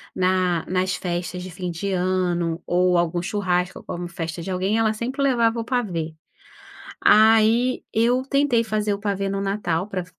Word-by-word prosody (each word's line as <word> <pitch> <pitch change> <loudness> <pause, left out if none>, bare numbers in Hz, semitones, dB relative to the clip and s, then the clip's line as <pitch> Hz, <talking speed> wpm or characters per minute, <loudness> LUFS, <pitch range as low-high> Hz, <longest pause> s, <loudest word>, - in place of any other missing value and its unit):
na 185 -2 +1
nas 185 0 0
festas 180 0 -4
de 185 - -8
fim 180 +1 -5
de 175 +4 -3
ano 180 -2 0
ou 180 0 +2
algum 175 0 0
churrasco 180 -2 -1
ou - - -17
como 175 0 -5
festa 165 0 -5
de 165 - -6
alguém, 190 +4 0
ela 220 -1 +2
sempre 250 +6 -4
levava 235 -4 +2
o - - -2
pavê. 180 -11 -2 0.9
Aí 225 +3 +4
eu 240 +3 +2
tentei 275 -3 +2
fazer 215 -2 -1
o 200 - -4
pavê 200 -1 -2
no 195 0 -2
Natal, 195 -3 -1
pra 185 -3 -3
185 Hz, 170 wpm, -23 LUFS, 180-220 Hz, 0.9 s, Aí